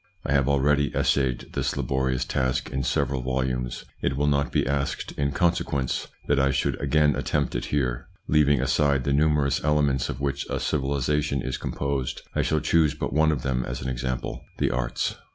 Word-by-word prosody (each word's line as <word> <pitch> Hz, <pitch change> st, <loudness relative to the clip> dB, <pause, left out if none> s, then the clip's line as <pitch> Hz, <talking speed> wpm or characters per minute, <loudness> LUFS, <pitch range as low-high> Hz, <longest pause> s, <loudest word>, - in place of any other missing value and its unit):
I -, -, -2 dB
have 70 Hz, -1 st, +3 dB
already 70 Hz, +1 st, +2 dB
essayed 65 Hz, -3 st, +1 dB
this -, -, -1 dB
laborious 65 Hz, -1 st, 0 dB
task 65 Hz, -1 st, -1 dB
in 65 Hz, -, -1 dB
several 65 Hz, 0 st, 0 dB
volumes; 65 Hz, -1 st, -2 dB, 0.2 s
it 65 Hz, -, 0 dB
will 75 Hz, -, +1 dB
not 70 Hz, -1 st, +1 dB
be -, -, +1 dB
asked, 70 Hz, 0 st, -2 dB
in 70 Hz, 0 st, -1 dB
consequence, 70 Hz, -5 st, 0 dB, 0.2 s
that 70 Hz, -1 st, +2 dB
I 70 Hz, 0 st, +3 dB
should -, -, 0 dB
again 75 Hz, +1 st, +3 dB
attempt 70 Hz, -2 st, -1 dB
it -, -, -2 dB
here. 65 Hz, -4 st, -1 dB, 0.2 s
Leaving 75 Hz, -2 st, +4 dB
aside 65 Hz, +1 st, +2 dB
the 70 Hz, -, 0 dB
numerous 75 Hz, -1 st, +2 dB
elements 70 Hz, -4 st, +2 dB
of 65 Hz, -, -4 dB
which 70 Hz, 0 st, -2 dB
a -, -, -1 dB
civilisation 70 Hz, 0 st, 0 dB
is 65 Hz, -, -3 dB
composed, 70 Hz, -2 st, -3 dB
I -, -, +1 dB
shall 80 Hz, -1 st, +1 dB
choose 80 Hz, -2 st, +3 dB
but 75 Hz, -, -3 dB
one 80 Hz, +1 st, +4 dB
of 70 Hz, -5 st, -2 dB
them 65 Hz, -2 st, 0 dB
as -, -, -5 dB
an 65 Hz, -, -2 dB
example: 65 Hz, 0 st, -3 dB
the -, -, +1 dB
arts. -, -, -1 dB
70 Hz, 185 wpm, -25 LUFS, 65-75 Hz, 0.2 s, Leaving